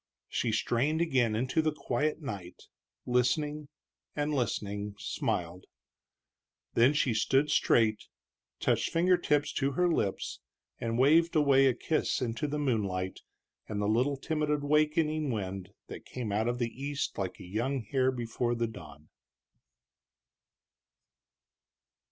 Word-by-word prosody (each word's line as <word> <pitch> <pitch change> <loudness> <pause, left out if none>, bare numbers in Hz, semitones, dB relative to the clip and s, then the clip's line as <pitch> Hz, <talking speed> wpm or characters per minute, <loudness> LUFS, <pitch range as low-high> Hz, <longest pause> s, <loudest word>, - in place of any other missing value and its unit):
She 115 - -1
strained 120 +8 +1
again 130 -9 +2
into 130 +7 +1
the 155 0 +1
quiet 150 +2 -2
night, 95 -9 -7 0.4
listening, 145 +5 0 0.5
and 150 0 -1
listening, 105 -5 -2
smiled. 90 -2 -3 1.1
Then 120 +5 +5
she 140 -4 +1
stood 135 +6 +2
straight, 110 -2 +3 0.5
touched - - +1
finger 180 +2 +3
tips 150 -4 +1
to 135 0 0
her 180 +6 +2
lips 130 - -1 0.4
and 115 0 -2
waved 165 +6 +4
away 140 -3 +5
a 130 - +2
kiss 160 - 0
into 125 +4 -2
the 150 +1 -2
moonlight 100 -10 -1 0.5
and 105 -2 -3
the 105 - 0
little 125 +6 +2
timid 150 +1 -2
awakening 150 +1 +1
wind 95 -5 -4 0.2
that - - -9
came 120 -5 -4
out 110 +3 0
of 120 0 0
the 120 -2 -1
east 140 0 -4
like 95 -2 -3
a - - -9
young 120 +7 -2
hare 130 +5 +1
before 120 -1 -2
the 115 0 0
dawn. 75 -8 -10
125 Hz, 130 wpm, -30 LUFS, 110-150 Hz, 1.1 s, Then